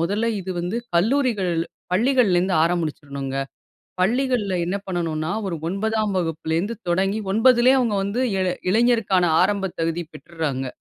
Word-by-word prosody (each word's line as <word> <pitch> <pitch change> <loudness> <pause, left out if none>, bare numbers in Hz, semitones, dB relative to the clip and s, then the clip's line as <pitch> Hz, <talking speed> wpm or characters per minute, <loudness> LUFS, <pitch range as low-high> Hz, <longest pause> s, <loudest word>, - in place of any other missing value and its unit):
மொதல்ல 205 +7 0
இது 190 0 -6
வந்து 180 +6 -3 0.2
கல்லூரிகள் 220 -3 +1 0.4
பள்ளிகள்லருந்து 195 -5 +3
ஆரம்பிச்சுரணுங்க. 145 -5 -3 0.6
பள்ளிகள்ல 235 -1 +1
என்ன 190 - -1
பண்ணனுன்னா 165 -4 -2 0.2
ஒரு 175 - -2
9தாம் 215 +2 -1
வகுப்புலேருந்து 165 +5 -2
தொடங்கி 195 +4 +1
9லயே 245 +4 +5
அவங்க 235 -5 +1
வந்து 200 +5 -2 0.2
இளை 185 -1 +1 0.2
இளைஞருக்கான 220 -4 +3 0.2
ஆரம்பத் 195 -1 -1
தகுதி 165 +1 -1
பெற்றுராங்க. 150 -6 -4
190 Hz, 115 wpm, -22 LUFS, 170-225 Hz, 0.6 s, 9லயே